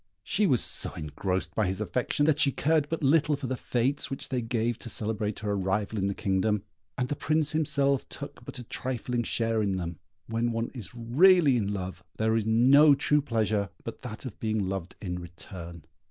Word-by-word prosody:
She 210 - +1
was 125 - +2
so - - -1
engrossed 90 +5 -3
by 110 -4 +1
his 95 +1 -2
affection, 120 +8 0
that 150 -1 +3
she 145 -2 +4
cared 150 +1 +1
but 165 -1 -3
little 150 +2 +4
for 140 -1 -6
the 130 - -1
fêtes 130 +2 0
which 135 - -6
they 125 -2 -1
gave 115 0 -1
to 115 - -7
celebrate 110 -1 -2
her 105 -1 -1
arrival 100 +2 -1
in 95 - +1
the 100 - -2
kingdom, 100 +1 0 0.3
and 125 - 0
the 145 - -2
Prince 155 +2 +1
himself 140 -3 +2
took - - -8
but - - -8
a 125 - -7
trifling 125 0 -2
share 115 -1 0
in 100 -2 0
them. 85 -3 -4 0.3
When 115 +1 -1
one 115 0 -2
is 115 -4 -8
really 140 +5 +5
in 105 -4 0
love, 95 -2 -5
there 110 0 +2
is 110 -1 0
no 135 +6 +6
true 150 +2 +2
pleasure 110 -5 0
but 115 - -7
that 125 -1 -7
of 125 - -7
being 110 -3 -1
loved 95 -2 -4
in 90 -3 -3
return. 85 -1 -9
115 Hz, 200 wpm, -28 LUFS, 100-135 Hz, 0.3 s, no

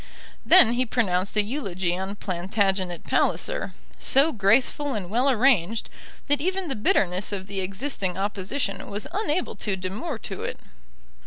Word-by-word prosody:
Then 240 -11 +7
he 250 +1 +2
pronounced 200 -5 0
a 210 - +5
eulogy 190 -8 -2
on 190 +2 -4
Plantagenet 190 -1 -1
Palliser, - - 0 0.2
so 280 +5 +4
graceful 250 +6 +2
and 190 -3 -5
well 250 +5 +3
arranged, 230 -5 +2 0.4
that 290 -1 +1
even 370 +1 -1
the 270 - -1
bitterness 195 -2 +1
of 195 -2 -4
the 195 0 -4
existing 190 -1 -3
opposition 195 +1 -3
was 205 +1 -4
unable 365 -4 -1
to 205 -3 -1
demur 200 - -4
to - - -7
it. - - -4
205 Hz, 145 wpm, -25 LUFS, 190-270 Hz, 0.4 s, Then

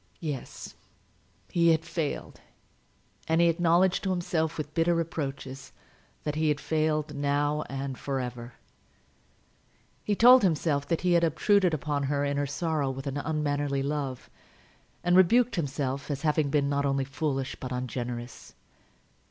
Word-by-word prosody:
Yes; 150 -7 -6 0.8
he 170 -1 +3
had 160 0 +2
failed: 165 -4 -4 0.9
and 160 +1 +2
he 170 0 +5
acknowledged 175 +2 +2
to 195 - -1
himself, 170 -3 -1
with 155 -1 -5
bitter 170 +1 +2
reproaches, 135 -5 -4 0.5
that 150 - -2
he 155 +1 0
had 150 -1 +1
failed, 155 -1 0
now 145 +1 0
and 135 0 -4
for 135 -1 -2
ever. 125 -1 -6 1.5
He 210 - 0
told 250 +4 +8
himself 155 -5 +1
that 165 - 0
he 180 -1 +2
had 170 0 +4
obtruded 180 +2 +3
upon 145 -1 -2
her 145 +1 0
in 140 0 -1
her 145 0 0
sorrow 150 0 -1
with 135 +1 -6
an 140 0 -3
unmannerly 145 -2 -1
love, 140 -3 -3 0.8
and 175 0 +3
rebuked 230 +7 +5
himself 140 -4 -3
as 145 0 -3
having 150 -2 +2
been 140 -1 +1
not 140 0 0
only 135 -1 0
foolish 135 -1 -2
but 130 - -6
ungenerous. 125 -1 -5
150 Hz, 145 wpm, -28 LUFS, 140-165 Hz, 1.5 s, told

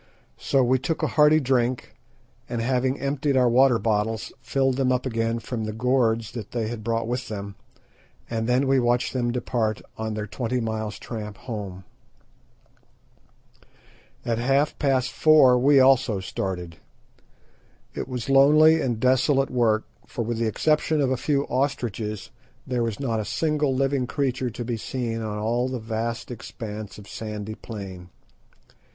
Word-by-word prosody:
So 135 -1 +2
we 130 +1 +2
took 155 +5 -2
a - - +2
hearty 150 +1 +6
drink, 130 -3 0 0.6
and 120 - -2
having 130 +3 0
emptied 140 0 0
our 125 -1 +4
water 125 +1 +5
bottles, 110 0 -1
filled 135 -1 0
them 130 -2 +2
up 125 0 0
again 115 -2 -1
from 115 0 -4
the 110 - -4
gourds 115 -2 +1
that 115 -4 -8
they 115 -3 -1
had 115 -2 -6
brought 115 0 -1
with 125 +1 -3
them, 100 -2 -6 0.7
and 115 0 -2
then 125 +3 +3 0.2
watched 120 0 +1
them 120 -2 0
depart 120 -3 -1 0.2
on 110 -1 -3
their 105 0 -3
twenty 120 +4 -2
miles' 110 -2 -3
tramp 105 -2 -7
home. 105 -6 -6 2.4
At 115 -1 0
half 135 +4 +2
past 130 -3 +1
four 145 -5 +5
we 140 +2 +5
also 130 -5 +4
started. 90 -2 -4 1.2
It - - -4
was 125 -3 -5
lonely 155 +4 +6
and 120 -5 -1
desolate 130 +2 +2
work, 115 -3 +2 0.2
for 120 - -3
with 115 0 -3
the 115 - +1
exception 155 +6 +1
of 135 -2 +2
a - - +2
few 140 +2 0
ostriches 120 -6 -2 0.3
there 125 -3 -1
was 115 -3 -2
not 115 -5 -1
a - - -1
single 150 +3 0
living 135 -1 0
creature 130 -2 -1
to 120 +1 -6
be 120 -1 -2
seen 115 0 -3
on 105 -1 -4
all 120 +4 0
the 130 - -3
vast 115 +1 -4
expanse 110 -2 -7
of 105 -1 -12
sandy 105 -1 -6
plain. 95 -6 -8
120 Hz, 155 wpm, -25 LUFS, 110-130 Hz, 2.4 s, hearty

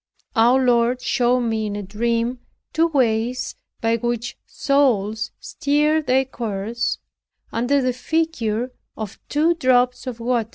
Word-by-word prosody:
Our 250 +3 +4
Lord 240 0 +3
showed 250 0 +2
me, 225 -2 -1
in 205 - -4
a 205 - -4
dream, 230 +4 -1 0.3
two 325 +2 +3
ways 250 -4 0 0.3
by 230 0 +2
which 240 +1 -2
souls 225 -6 +1
steer 300 +2 +1
their 265 -2 +2
course, 230 -2 -3 0.5
under 260 +4 +1
the 255 0 +1
figure 255 -6 -1 0.3
of 215 -3 -6
two 315 +4 +3
drops 255 -4 +2
of 240 -2 -5
water. 235 -2 0
245 Hz, 130 wpm, -22 LUFS, 225-265 Hz, 0.5 s, Our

